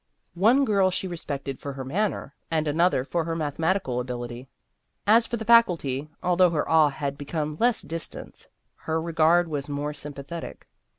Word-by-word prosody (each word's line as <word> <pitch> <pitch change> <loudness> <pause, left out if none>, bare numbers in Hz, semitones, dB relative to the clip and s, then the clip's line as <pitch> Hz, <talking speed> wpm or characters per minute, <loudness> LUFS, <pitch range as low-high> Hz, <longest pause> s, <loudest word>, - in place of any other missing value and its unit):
One 230 +10 +4
girl 200 -5 +3
she 185 +1 -2
respected 140 -6 -5
for 140 - -6
her 135 -1 -6
manner, 180 -1 -2 0.2
and 155 -1 0
another 160 -2 +2
for 170 +5 -1
her 165 0 -2
mathematical 160 -2 -1
ability. 125 0 -6 0.6
As 225 +3 +5
for 235 - -2
the 220 - -6
Faculty, 165 - +3
although 180 0 +4
her 155 -3 -1
awe 160 -2 +5
had 140 0 -4
become 150 +1 -3
less 240 -1 +2
distant, 165 +1 -6 0.3
her 160 0 -2
regard 165 +1 +3
was 145 -2 -4
more 145 +1 -3
sympathetic. 150 +3 -7
160 Hz, 160 wpm, -25 LUFS, 140-180 Hz, 0.6 s, As